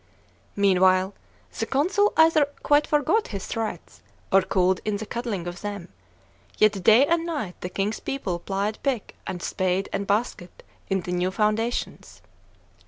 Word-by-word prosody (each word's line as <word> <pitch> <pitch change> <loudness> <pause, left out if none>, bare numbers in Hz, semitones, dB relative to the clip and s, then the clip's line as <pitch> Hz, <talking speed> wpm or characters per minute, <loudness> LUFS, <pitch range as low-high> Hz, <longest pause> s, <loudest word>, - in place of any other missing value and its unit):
Meanwhile, 190 -1 +3 0.5
the 225 - -1
consul 380 +10 +2
either 320 -2 +5 0.2
quite 290 0 +3
forgot 305 +9 +2
his 200 -3 -6
threats, 220 -7 -5 0.3
or 195 - +6
cooled 185 0 +1
in 210 -1 -1
the 220 - -6
cuddling 230 -6 -4
of 175 +1 -6
them; 205 -3 -6 0.7
yet 205 -3 +3
day 225 +8 +7
and 335 +1 +1
night 295 - -4
the 180 - -4
king's 200 +3 -2
people 195 -11 -3
plied 200 +4 -3
pick 260 -7 -2
and 180 -2 -5
spade 185 0 -1
and 200 - -2
basket 200 -4 -2 0.3
in 190 -1 +1
the 180 - -6
new 180 +1 0
foundations. 215 +4 -2
205 Hz, 150 wpm, -25 LUFS, 185-245 Hz, 0.7 s, day